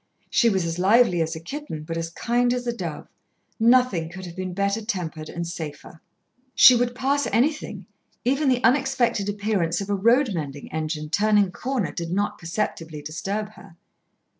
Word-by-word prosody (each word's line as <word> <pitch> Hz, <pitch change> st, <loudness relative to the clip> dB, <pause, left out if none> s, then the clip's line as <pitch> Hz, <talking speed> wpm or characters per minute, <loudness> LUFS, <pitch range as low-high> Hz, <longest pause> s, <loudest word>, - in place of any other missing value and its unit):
She 235 Hz, -, +4 dB
was 190 Hz, -5 st, 0 dB
as 165 Hz, +1 st, -3 dB
lively 195 Hz, -2 st, +4 dB
as 160 Hz, 0 st, -1 dB
a -, -, -6 dB
kitten, 170 Hz, -, -6 dB
but 165 Hz, +2 st, -5 dB
as 165 Hz, 0 st, -3 dB
kind 240 Hz, +7 st, +1 dB
as 245 Hz, 0 st, -4 dB
a 240 Hz, -1 st, -2 dB
dove. -, -, -6 dB, 0.5 s
Nothing 230 Hz, -8 st, +3 dB
could 185 Hz, +2 st, -8 dB
have 170 Hz, -1 st, -9 dB
been 185 Hz, -1 st, -5 dB
better 200 Hz, +3 st, 0 dB
tempered 165 Hz, -7 st, -4 dB
and 170 Hz, 0 st, -4 dB
safer. 160 Hz, -1 st, -8 dB, 0.5 s
She 255 Hz, -, +9 dB
would 245 Hz, 0 st, 0 dB
pass 280 Hz, +3 st, +1 dB
anything, 290 Hz, +8 st, 0 dB, 0.4 s
even 275 Hz, +3 st, +2 dB
the 250 Hz, -1 st, +1 dB
unexpected 250 Hz, -5 st, +2 dB
appearance 200 Hz, -5 st, 0 dB
of 200 Hz, 0 st, -4 dB
a -, -, +2 dB
road 230 Hz, +4 st, +3 dB
mending 145 Hz, -4 st, -6 dB
engine 155 Hz, -1 st, -3 dB
turning 205 Hz, 0 st, +3 dB
a -, -, -11 dB
corner 250 Hz, -3 st, -2 dB
did 170 Hz, -1 st, -5 dB
not 200 Hz, +4 st, -1 dB
perceptibly 165 Hz, -4 st, -4 dB
disturb 195 Hz, +8 st, -3 dB
her. 165 Hz, -6 st, -16 dB
200 Hz, 175 wpm, -24 LUFS, 165-240 Hz, 0.5 s, She